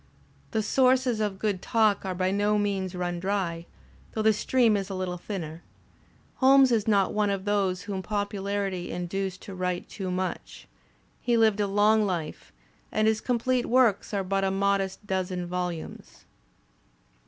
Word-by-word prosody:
The 220 -2 -1
sources 255 0 +3
of 205 -3 -1
good 200 -2 -1
talk 220 -3 +2
are 185 -1 -2
by 185 +1 0
no 205 +1 +2
means 195 -3 -1
run 175 -1 -2
dry, 175 -3 -2 0.5
though 220 - -1
the 220 0 +5
stream 230 +1 +2
is 200 -1 -2
a 195 - -4
little 180 -1 -3
thinner. 170 -5 -6 0.8
Holmes 270 -1 +6
is 225 -3 +1
not 200 -3 +3
one 210 -1 +1
of 195 -1 -2
those 195 -3 0
whom 200 -2 -4
popu 205 0 -3
larity 195 -2 -2
induced 185 +1 -4
to 195 - -8
write 180 -1 -3
too 190 -2 -5
much. 185 0 -4 0.5
He 240 -1 +1
lived 220 -2 +3
a 205 - +1
long 210 +2 +3
life, 175 -6 -4 0.4
and 215 0 +2
his 220 0 +2
complete 250 0 0
works 240 -5 +3
are 200 -2 -1
but 195 +1 -1
a 195 - +2
modest 195 0 0
dozen 185 -2 -2
volumes. 180 -2 -5
200 Hz, 165 wpm, -27 LUFS, 185-215 Hz, 0.8 s, Holmes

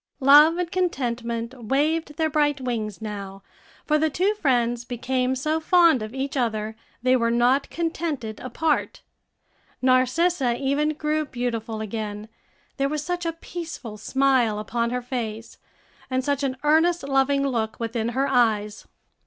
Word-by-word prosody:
Love 295 +5 +7
and 355 -1 -2
Contentment 240 -9 -2
waved 295 +5 0
their 320 - +2
bright 295 -2 +1
wings 225 -5 -4
now; 200 -2 -6 0.4
for 305 0 +2
the 315 +1 +2
two 370 +8 +1
friends 240 - +1
became 255 +1 -1
so 305 +5 -1
fond 335 - +4
of 215 0 -5
each 270 +2 -4
other 220 -4 -1 0.3
they 255 0 +4
were 230 -2 +2
not 245 +4 +2
contented 320 -10 -3
apart. 295 +5 -1 0.8
Narcissa 255 +1 +2
even 290 +3 0
grew 305 +1 0
beautiful 230 -4 -3
again, 215 0 -5 0.5
there 275 0 +1
was 300 0 -3
such 350 0 -2
a - - +1
peaceful 325 -9 -7
smile 255 -1 +2
upon 235 +2 -1
her 250 +1 -3
face, 230 -3 -5 0.5
and 260 0 -1
such 285 -1 0
an 265 -2 -1
earnest, 325 +3 +3
loving 275 0 +2
look 225 -5 -2
within 230 0 -2
her 265 +3 0
eyes. 220 -5 +1
260 Hz, 145 wpm, -24 LUFS, 230-300 Hz, 0.8 s, Love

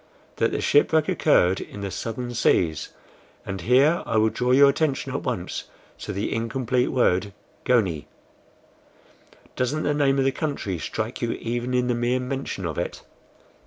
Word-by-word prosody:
"That - - +1
the - - -2
shipwreck 155 +1 +3
occurred 95 - +3
in 100 - -8
the 100 -1 -4
southern 120 +4 -4
seas; 85 -8 +1 0.6
and 95 -2 -5
here 135 - +4
I 110 - 0
would 110 0 +3
draw 125 0 -1
your 140 +2 +7
attention 140 0 0
at - - -2
once - - -4 0.3
to - - -5
the 100 +1 -2
incomplete 125 +2 0
word 100 -6 +1 0.3
GONIE. 95 -12 +1 1.5
Doesn't 140 +5 -1
the 150 - +1
name 140 -2 +2
of 135 - +2
the 135 - +3
country 135 - -3
strike 110 +8 -4
you 120 -1 0
even 120 +2 -3
in 125 0 +2
the 125 - +1
mere 120 +2 0
mention 130 -7 -4
of 80 -3 -3
it?" - - -4
125 Hz, 160 wpm, -24 LUFS, 105-135 Hz, 1.5 s, your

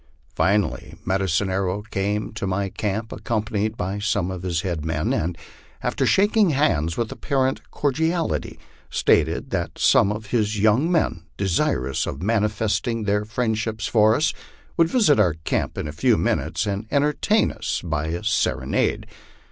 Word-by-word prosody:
Finally 100 +8 0
Med 95 +1 +1
icine 95 +1 0
Arrow 95 +1 -1
came 105 0 -2
to 110 -3 -3
my 95 +1 -1
camp, 110 +3 -3
accompanied 110 -1 -2
by 95 +3 -3
some 100 -3 0
of 95 -2 -5
his 85 -3 -1
head 85 -5 -3
men, 80 -1 -1
and 85 +2 -1 0.5
after - - 0
shaking 205 0 +4
hands 110 - +1
with 115 -2 -1
apparent 135 -2 0
cordiality, 160 +4 -1 0.3
stated - - +1
that - - -2
some 100 - +4
of 105 0 -6
his 110 -3 +1
young 110 - +3
men, 90 - 0
desirous 70 -8 0
of 65 - -4
manifesting 110 +2 0
their 105 0 0
friendship 110 0 -2
for 110 0 +3
us, 155 +3 +1 0.4
would 165 -1 +3
visit 185 - +4
our 90 -6 +3
camp - - -1
in - - -3
a - - -4
few - - +3
minutes, 85 +5 0
and 100 +1 -3
entertain 150 +9 +2
us - - -3
by 80 -3 -2
a 85 +4 -3
serenade. 110 +1 0
105 Hz, 155 wpm, -23 LUFS, 95-115 Hz, 0.5 s, shaking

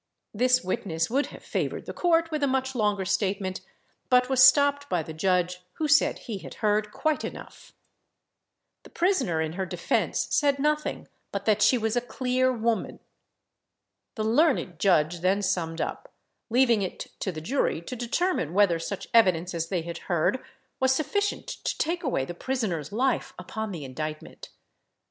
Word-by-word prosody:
This 250 +3 +3
witness 180 -3 -2
would 275 +3 +1
have - - -12
favoured - - -3
the - - -6
court 330 -1 +2
with 305 -1 -2
a 280 - +3
much 265 0 0
longer 210 -5 0
statement, 190 0 -1 0.5
but 250 0 +4
was 260 -1 +3
stopped 285 +1 +5
by 175 -3 0
the 160 - -8
judge, 180 +2 0
who 310 - -2
said 295 +1 +4
he 215 -5 -6
had - - -10
heard 210 -1 0
quite 310 +5 -1
enough. - - -9 1.1
The - - -15
prisoner, 315 - +1
in 160 0 -2
her 190 +2 -2
defence, - - 0
said 285 -2 +3
nothing, 300 +2 -1 0.2
but 200 0 -4
that 215 -1 +2
"she 250 - +5
was 225 0 -1
a 245 - +2
clear 255 +1 0
woman." 230 -2 -1 1.2
The 215 - -2
learned 225 - +2
judge 175 -3 +3
then 190 +4 +1
summed 170 -4 -1
up, - - -5 0.4
leaving 240 -2 +4
it 190 - -5
to 190 - -2
the 155 - -6
jury 230 - 0
to 250 - -6
determine 240 - -1
whether 195 -5 +4
such 190 +4 -5
evidence 185 -6 +4
as 165 -1 -3
they 180 -4 -1
had 170 0 -6
heard 175 +9 +1 0.4
was 260 0 +3
sufficient 405 +8 -1
to - - -4
take 340 +2 -1
away 245 - 0
the 175 - -6
prisoner's 180 - -3
life 255 +4 0
upon 215 +4 -5
the 160 -6 -6
indictment. 155 +4 -7
215 Hz, 165 wpm, -26 LUFS, 180-265 Hz, 1.2 s, stopped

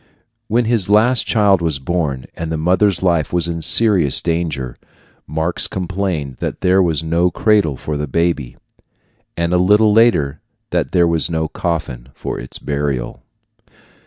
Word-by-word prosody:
When 115 +2 +1
his 110 -5 +1
last 115 +4 +3
child 100 -5 +3
was 80 -4 -1
born, 70 -3 -2
and 80 -1 -5
the 80 - -1
mother's 95 +3 +1
life 85 -5 +1
was 85 -1 +1
in 85 -1 -4
serious 95 -6 +4
danger, 80 -7 -3 0.5
Marx 80 +3 -2
complained 90 -7 -3
that - - -5
there 95 0 +3
was 80 -3 0
no 85 +2 +1
cradle 100 -8 +1
for 75 -1 -4
the 75 0 -3
baby, 80 -3 -1 0.8
and 85 +1 -1
a 90 - +3
little 105 +3 +4
later 80 -11 +2 0.3
that - - -1
there 85 -1 +3
was 85 -1 +1
no 80 -1 -1
coffin 75 -8 -4
for - - -5
its 60 - -8
burial. 70 -4 -3
85 Hz, 155 wpm, -17 LUFS, 75-95 Hz, 0.8 s, serious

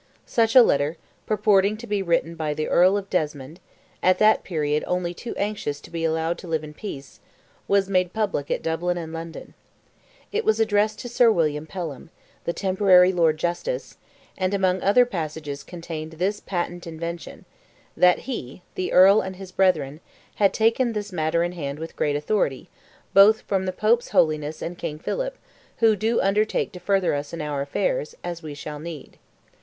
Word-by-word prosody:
Such 225 0 +1
a 255 - +10
letter, 145 -2 +1 0.3
purporting 210 -1 +3
to 235 - -9
be 205 -3 -1
written 170 -2 0
by 155 -2 -3
the 155 - -2
Earl 185 +3 +4
of 200 -1 -5
Desmond—at 155 +3 -2
that 215 +2 +4
period 150 -3 -1
only 180 -1 -1
too 230 +7 -7
anxious 200 -8 -2
to - - -14
be 165 -1 -3
allowed 160 +1 0
to 180 - -10
live 160 -2 -1
in 150 0 -9
peace—was 195 +4 -4
made 185 -2 +1
public 200 -10 -2
at - - -1
Dublin 175 +2 -1
and 165 -1 -6
London. 165 0 -8 0.8
It 440 +2 -1
was 220 0 +2
addressed 215 -1 +2
to 245 - -6
Sir 240 -1 +4
William 155 -5 0
Pelham, 165 -7 -6 0.4
the - - 0
temporary 185 -1 +4
Lord 165 -3 +2
Justice, 175 - -3 0.4
and 185 +1 0
among 185 -2 +1
other 225 +6 +5
passages 155 - -5
contained 165 -2 -7
this 190 +6 -1
patent 175 -1 -4
invention—that 170 +2 -2
he 180 - -6
(the 185 - -3
Earl 195 +3 +7
and 190 0 -6
his 190 0 -10
brethren) 155 -7 +1 0.4
"had 200 -2 +4
taken 230 +2 +2
this 210 -1 -4
matter 165 -1 0
in 175 - -1
hand 145 -5 -5
with 160 +1 -8
great 145 -1 0
authority, 150 -3 -1 0.4
both 205 +3 +7
from 190 -1 -1
the - - 0
Pope's 220 +5 +1
holiness 155 -1 +1
and 175 +1 -6
King 150 - -4
Philip, - - -3 0.4
who 225 -2 +4
do 220 +3 0
undertake 210 +2 +1
to 180 - -10
further 195 0 +1
us 145 +1 -4
in 165 - -4
our 145 -2 -2
affairs, - - -2
as 170 -1 -5
we 155 -3 -7
shall 150 +1 -7
need." 160 -1 -9
180 Hz, 170 wpm, -24 LUFS, 155-205 Hz, 0.8 s, a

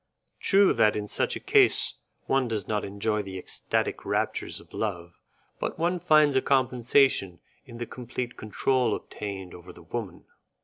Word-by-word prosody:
True 195 0 +4
that 105 - +3
in 105 -1 -3
such - - 0
a - - -4
case - - +3 0.3
one 135 -2 +1
does 110 -4 -3
not 105 -1 -1
enjoy 105 +2 -1
the 95 -2 -7
ecstatic 90 - -2
raptures - - -2
of - - -18
love, 85 -5 -4 0.4
but - - -3
one 175 +2 0
finds 155 -3 +4
a 130 - +4
compensation 125 -6 +2 0.3
in 120 -2 -10
the 120 - -4
complete 125 0 -6
control 120 +2 0
obtained 95 -3 -7
over 90 +1 -11
the - - -15
woman. 100 +2 -6
115 Hz, 160 wpm, -27 LUFS, 100-130 Hz, 0.4 s, True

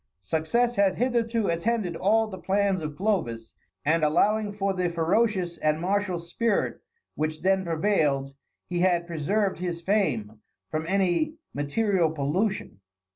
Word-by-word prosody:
Success 235 - 0
had 200 -2 +3
hitherto 235 -2 +1
attended 180 +1 0
all 215 +6 +3
the 190 -4 -8
plans 195 -1 +1
of 150 -1 -5
Clovis, 160 - -1 0.3
and 160 +2 +2
allowing 210 +7 +2
for 200 -1 -1
the 180 -2 0
ferocious 175 +1 +1
and 155 0 +1
martial 190 +1 0
spirit 195 +6 -1 0.3
which 155 0 -2
then 190 0 +3
prevailed, 155 -6 +1 0.3
he 175 -1 -3
had 175 -1 +2
preserved 180 +5 -1
his 175 -2 -3
fame 120 - 0 0.3
from 155 +1 -2
any 195 - +1 0.2
material 170 +4 +1
pollution. 160 - -2
185 Hz, 130 wpm, -26 LUFS, 160-205 Hz, 0.3 s, had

